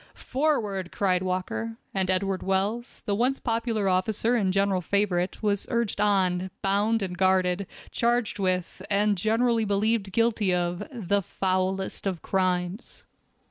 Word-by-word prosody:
"Forward!" 225 - -1
cried 185 -3 +1
Walker, 185 +5 -3 0.2
and 190 -1 0
Edward 190 0 0
Wells, 200 +5 -1
the 205 - 0
once 250 +6 +1
popular 230 -3 0
officer 195 +5 +1
and 205 -6 +2
general 195 -1 +2
favorite, 190 0 0
was 205 -2 0
urged 235 -3 0
on, 190 -3 +2
bound 205 +3 +2
and 180 -2 -3
guarded, 185 0 +2 0.2
charged 235 -3 0
with, 185 -1 -1
and 205 +1 +2
generally 225 +4 +2
believed 205 0 0
guilty 215 -3 +2
of, 175 0 -1
the 200 -5 0
foulest 190 +1 -1
of 185 -4 -3
crimes. 185 +2 -1
195 Hz, 135 wpm, -26 LUFS, 185-220 Hz, 0.2 s, and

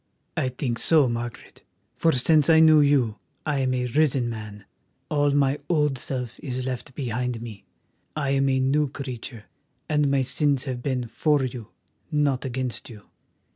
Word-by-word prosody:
"I 130 - 0
think 125 -2 -3
so, 155 -5 +4
Margaret, 120 0 -6 0.3
for 165 - +3
since 150 +3 +3
I 160 -1 +7
knew 155 -1 +7
you 130 -7 +2 0.3
I 150 -3 0
am 130 -1 +1
a 125 0 -1
risen 130 -2 +1
man; 105 -3 -8 0.5
all 145 -1 +2
my 140 0 +2
old 150 -5 +1
self 125 -3 -4
is 130 -3 -4
left 130 0 -5
behind 125 -2 -2
me, 110 -3 -9 0.5
I 140 -3 -1
am 135 0 +2
a 130 0 +2
new 140 +2 +2
creature, 125 -4 -7 0.4
and 150 -2 +2
my 135 -1 +2
sins 140 0 0
have 130 -3 -4
been 125 -2 -2
for 145 +5 +1
you, 120 -4 -6 0.4
not 140 -3 +1
against 130 -2 -4
you. 105 -3 -13
130 Hz, 165 wpm, -25 LUFS, 120-145 Hz, 0.5 s, I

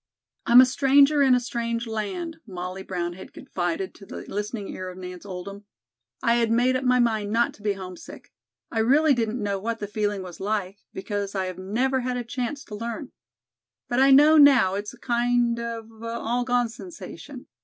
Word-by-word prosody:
"I'm 240 +2 +9
a - - +7
stranger 275 +3 +4
in 265 -2 +5
a - - +3
strange 235 -1 -3
land," 230 - -4
Molly 185 0 -6
Brown 175 -2 -3
had 185 - -12
confided 175 +1 -3
to 200 - -14
the - - -8
listening 210 0 -4
ear 185 0 -6
of 180 - -10
Nance 180 +1 -8
Oldham. 200 +2 -8 0.6
"I 235 0 +3
had 230 -1 +2
made 245 +3 +3
up 255 - -1
my 250 -1 +3
mind 220 -4 +1
not 235 +2 +2
to - - -18
be 205 -1 0
homesick. 185 -2 -10 0.4
I 225 - -1
really 285 +7 +4
didn't 230 -2 -1
know 200 -1 -1
what 230 +3 -3
the 210 - -4
feeling 205 -1 -2
was 180 -2 -10
like, 200 -1 -2
because 200 +1 -4
I 190 -1 0
have 185 0 -6
never 250 +8 0
had 250 0 -2
a 245 - -3
chance 250 +4 -4
to 210 - -9
learn. 235 +6 -5 0.8
But 245 - 0
I 270 +1 +6
know 295 +4 +7
now 265 -10 +6
it's 205 +1 -4
a - - -25
kind 240 -1 +1
of 230 -1 -5
an 225 0 -15
all 235 +1 -2
gone 245 -2 +1
sensation. 335 +9 -10
230 Hz, 195 wpm, -25 LUFS, 200-250 Hz, 0.8 s, I'm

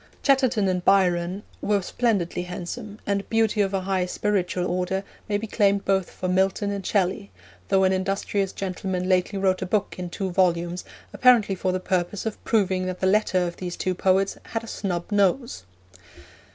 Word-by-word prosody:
Chatterton 260 -7 +3
and 180 -1 0
Byron 180 0 +2 0.2
were 205 -2 +1
splendidly 195 -5 0
handsome, 180 +5 -6
and 200 0 -1
beauty 225 -1 +2
of 195 -1 +1
a 195 -1 -1
high 185 -1 0
spiritual 185 -2 -1
order 185 +2 -1 0.3
may 205 - +2
be 215 - -4
claimed 200 -2 +1
both 190 -2 +1
for 185 - -5
Milton 190 +2 +1
and 200 -1 -4
Shelley, 195 +1 0 0.4
though 195 -1 +3
an 190 0 +3
industrious 195 +1 -1
gentleman 185 -1 -3
lately 185 +2 +1
wrote 190 -1 +1
a 185 - -2
book 205 +1 -1
in 180 -1 -4
two 190 +2 -3
volumes 175 -1 +1 0.3
apparently 240 -6 +5
for 185 0 -1
the 185 - -1
purpose 185 +2 -1
of 220 - -4
proving 190 -4 +1
that 185 0 -4
the - - 0
latter 190 -2 +2
of 175 - -5
these 180 -1 -5
two 185 - -1
poets 190 +2 +1
had 225 0 -4
a - - -9
snub 180 -3 -3
nose. 205 - +1
190 Hz, 180 wpm, -24 LUFS, 180-205 Hz, 0.4 s, apparently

